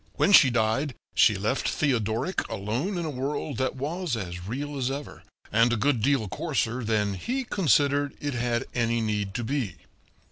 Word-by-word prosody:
When 200 - +3
she 145 -9 +8
died 120 +4 0 0.2
she - - +5
left - - 0
Theodoric 120 - 0
alone 115 - -2
in 170 - -2
a 155 - -2
world 140 0 -3
that 130 0 -1
was 155 +2 -2
as 90 -3 -6
real 145 +6 -4
as 130 -2 -1
ever, 140 +2 -6 0.3
and 115 +3 +4
a - - +2
good 125 0 +1
deal 130 -3 +2
coarser 125 - -2
than 105 -2 +1
he 255 - -2
considered 145 - +2
it 145 -1 -3
had 120 -1 -1
any 115 -1 +1
need 105 -3 -2
to 120 - -2
be. 115 - -2
125 Hz, 175 wpm, -26 LUFS, 110-145 Hz, 0.3 s, she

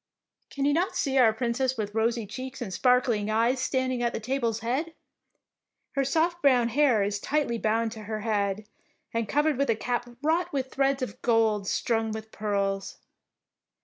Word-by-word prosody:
Can 280 -1 -2
you 290 - +3
not 350 +5 0
see 270 -1 +1
our 230 -3 +6
Princess 245 +3 -1
with 210 -2 -3
rosy 230 +1 0
cheeks 255 +6 -7
and 215 -7 -5
sparkling 245 -4 +2
eyes 230 +4 +2
stand 260 0 0
ing 245 - -2
at 235 0 0
the - - -2
table's 230 -1 -1
head? 280 +8 -2 1.0
Her 275 - 0
soft 330 +5 +1
brown 250 -4 +4
hair 250 -4 +3
is 205 0 -1
tightly 280 -2 -1
bound 225 +1 +1
to 215 -2 -9
her 215 0 -4
head 205 -1 -1 0.5
and 230 -2 -1
covered 295 -1 +1
with 280 - +1
a 230 - +3
cap 245 +2 -2
wrought 330 +3 +1
of 265 -1 -2
threads 275 0 +1
of 255 - -6
gold 220 -4 +2
strung 225 0 0
with 220 0 -7
pearls. 200 -2 -2
235 Hz, 180 wpm, -27 LUFS, 220-270 Hz, 1.0 s, our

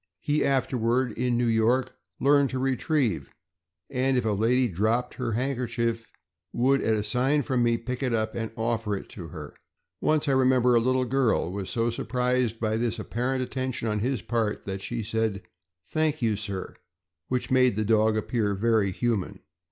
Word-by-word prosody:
He 150 +1 +1
afterward, 125 -2 +1
in 120 +2 0
New 120 - +1
York, 120 +3 +2 0.3
learned 140 0 +4
to 130 - -3
retrieve; 130 - 0 0.6
knd 130 +1 +1
if 125 -2 +1
a 110 - +2
lady 120 +5 +2
dropped 110 +6 0
her 120 -3 -3
hand 130 +3 -1
kerchief, 115 -2 -2 0.4
would, 135 +3 +2
at 110 - +2
a 105 - -1
sign 130 +7 +1
from 130 -3 0
me, 120 -1 +3
pick 125 +2 -5
it 130 -2 0
up 110 -1 0
and 115 -1 -3
offer 115 -2 -1
it - - -10
to 85 -5 -8
her. 75 -2 -9 0.5
Once 155 -1 +1
I - - +3
remember 130 -2 +4
a 120 - +5
little 130 +2 +1
girl 125 -8 +1
was 95 -1 -4
so 115 +5 0
surprised 125 -1 0
by 110 -1 0
this 115 0 -1
apparent 125 +4 -2
attention 130 -2 -3
on 105 -1 0
his 125 0 -1
part 115 -2 -1
that 95 -1 -4
she 115 +2 -3
said 110 -2 -1 0.4
"Thank 155 - 0
you, 110 -3 +1
sir," 100 -2 -5 0.5
which 125 0 -2
made 130 -4 +4
the 110 0 -1
dog 110 0 +3
appear 110 -2 0
very 110 -1 +2
human. 110 -1 -2
120 Hz, 180 wpm, -26 LUFS, 110-130 Hz, 0.6 s, a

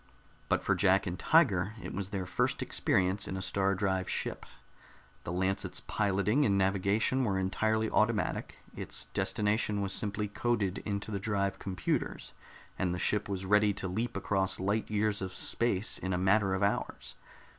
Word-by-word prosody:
But - - +1
for - - +2
Jack 95 +3 +3
and 90 -1 -4
Tiger, 110 - +3
it - - -7
was 95 0 -3
their 95 -3 -3
first 90 - 0
experience 95 +2 +1
in 95 - -4
a - - -4
star 95 +1 +1
drive 95 -1 -1
ship. - - -3 0.8
The - - -3
Lancet's 95 +2 -1
piloting 105 +7 +1
and 100 -5 +2
navigation 100 +7 +2
were 100 -5 0
entirely 110 +4 +1
automatic; 110 0 0 0.2
its - - -4
destination 105 0 +1
was 100 -1 -1
simply 105 0 -1
coded 105 -3 -1
into 100 +1 -3
the 100 - -2
drive 100 -1 -1
computers, 95 -2 -3 0.5
and 90 -2 0
the - - -4
ship 105 +2 0
was 95 -1 -3
ready 105 +1 +4
to 95 -1 -4
leap 110 +5 -2
across 95 -1 0
light 100 +4 -1
years 105 -1 0
of 95 -1 -5
space 115 -3 +1
in 95 0 -2
a - - +1
matter 95 +1 +3
of 95 - -1
hours. 80 -11 -2
100 Hz, 165 wpm, -31 LUFS, 95-105 Hz, 0.8 s, ready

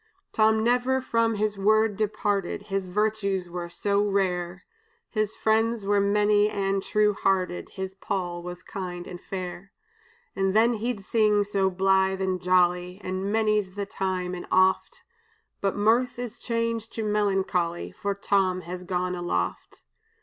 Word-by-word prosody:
"Tom 220 0 +3
never 250 +2 +2
from 230 -3 +1
his 210 -1 -1
word 215 +1 +3
departed, 205 -2 -1
His 195 -2 -3
virtues 200 -1 0
were 175 -1 -5
so 200 +4 0
rare; 185 -3 -1 0.5
His 215 -2 -1
friends 225 0 +1
were 205 0 +3
many 205 +1 +3
and 195 -1 -1
true 210 +1 +2
hearted, 185 -3 0
His 190 0 -4
Poll 185 -3 -3
was 180 +1 -8
kind 180 -2 -6
and 175 0 -9
fair. 185 +1 -6 0.6
And 195 0 0
then 230 +2 +5
he'd 225 -2 -3
sing 210 -2 +3
so 200 -1 +1
blithe 190 0 +2
and 185 -1 -1
jolly; 180 0 +2
Ah, 185 - -4
many's 205 +1 0
the 200 -1 -2
time 185 -2 -2
and 180 - -6
oft! 185 0 +2 0.6
But 195 -1 0
mirth 230 +5 +2
is 245 -2 -6
changed 230 -1 -2
to 225 - -3
melancholy, 195 -5 0
For 200 0 -3
Tom 190 -2 +1
is 180 +2 -6
gone 180 0 -1
aloft. 95 - -3
195 Hz, 145 wpm, -26 LUFS, 185-215 Hz, 0.6 s, then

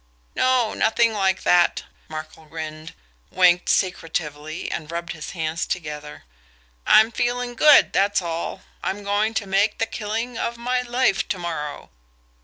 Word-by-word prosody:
"No, 255 -3 +2
nothing 230 0 +2
like 190 -2 0
that!" 175 -1 +3 0.3
Markel 155 0 -8
grinned, 155 0 -8 0.3
winked 180 -1 +3
secretively, 160 -3 -2
and 155 -2 -5
rubbed 170 0 -4
his 155 -2 -8
hands 160 +1 -2
together. 150 -4 -6 0.6
"I'm 220 +2 +6
feeling 245 +1 -1
good, 295 +5 +6
that's 200 +1 +2
all 170 +1 -4 0.2
I'm 205 +2 -3
going 205 +2 0
to 205 - -1
make 195 +2 +1
the 225 - +1
killing 225 +2 -4
of 235 - -2
my 250 +1 0
life 245 -4 +1
to 195 - -2
morrow." 160 -4 -5
190 Hz, 140 wpm, -23 LUFS, 160-225 Hz, 0.6 s, I'm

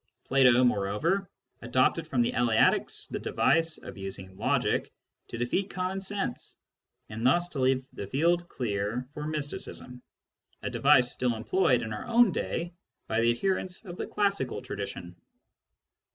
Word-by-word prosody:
Plato, 130 -2 +5
moreover, 125 - +1 0.3
adopted - - +1
from 120 -2 +2
the - - 0
Eleatics 120 -2 +2
the - - -5
device 165 -1 +1
of - - -10
using 95 -1 -7
logic - - 0 0.4
to 120 - -6
defeat 120 - -1
common 185 +1 -3
sense, 200 0 -4 0.5
and 110 +1 -6
thus 175 +8 +3
to 150 - -5
leave 130 0 +2
the 100 - -6
field 170 - +1
clear 110 +1 -2
for 150 +1 -5
mysticism 145 -4 -4 0.3
— - - -42
a - - -3
device 135 -3 +4
still 125 -2 0
employed 125 +1 +2
in 110 -1 -4
our 105 - -6
own 235 -3 +5
day 170 0 -3 0.3
by 110 +1 0
the 115 - +4
adherents 185 - -1
of 175 -2 -7
the - - -4
classical 200 - -1
tradition. 90 0 -6
130 Hz, 150 wpm, -28 LUFS, 115-175 Hz, 0.5 s, Plato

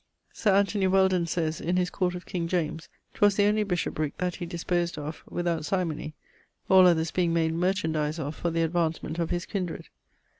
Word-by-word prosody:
Sir 205 -3 +2
Anthony 200 -1 +2
Weldon 190 -2 +3
sayes 165 -1 -1
(in 175 +2 0
his 180 0 0
Court 180 -2 -1
of 180 - -8
King 170 -2 -3
James), 165 -2 -2 0.2
'twas 205 -1 +3
the 205 - +3
only 210 +1 +3
bishoprick 165 -6 -2
that 180 0 -2
he 175 - -5
disposed 175 0 -1
of 150 +1 -6
without 170 -2 -1
symony, 160 -3 -2 0.5
all 185 -1 +8
others 165 -2 +2
being 170 -2 +1
made 160 -1 +1
merchandise 160 -4 0
of 150 -1 -3
for 170 - -2
the 165 0 0
advancement 165 -1 -1
of 170 - -1
his 175 0 -2
kindred. 185 -5 -4
175 Hz, 185 wpm, -27 LUFS, 160-185 Hz, 0.5 s, all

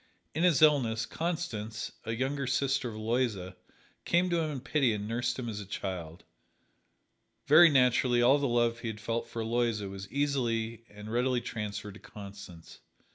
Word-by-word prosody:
In 160 - -2
his 170 -4 +4
illness, 120 -7 +3
Constance, 120 -11 -4
a 115 0 -2
younger 135 +3 -2
sister 135 0 0
of 110 - -8
Aloysia, 110 -5 -1 0.5
came 175 +1 +2
to 170 - +2
him 160 -1 -1
in 145 -3 -4
pity 135 -2 +1
and 105 0 -4
nursed 120 +1 -1
him 125 -2 -4
as 105 -2 -4
a - - -5
child. 90 -4 -5 1.2
Very 160 +4 +8
naturally, 125 -2 +3
all 130 +4 +5
the 140 - 0
love 120 -1 +1
he 120 - -5
had 110 -1 -5
felt 115 +2 -2
for 115 -1 -4
Aloysia 115 -3 0
was 95 0 -8
easily 115 -5 -1
and 105 +1 -10
readily 125 +1 +1
transferred 105 -3 -5
to 105 - -13
Constance. 100 -5 -11
120 Hz, 170 wpm, -30 LUFS, 105-135 Hz, 1.2 s, Very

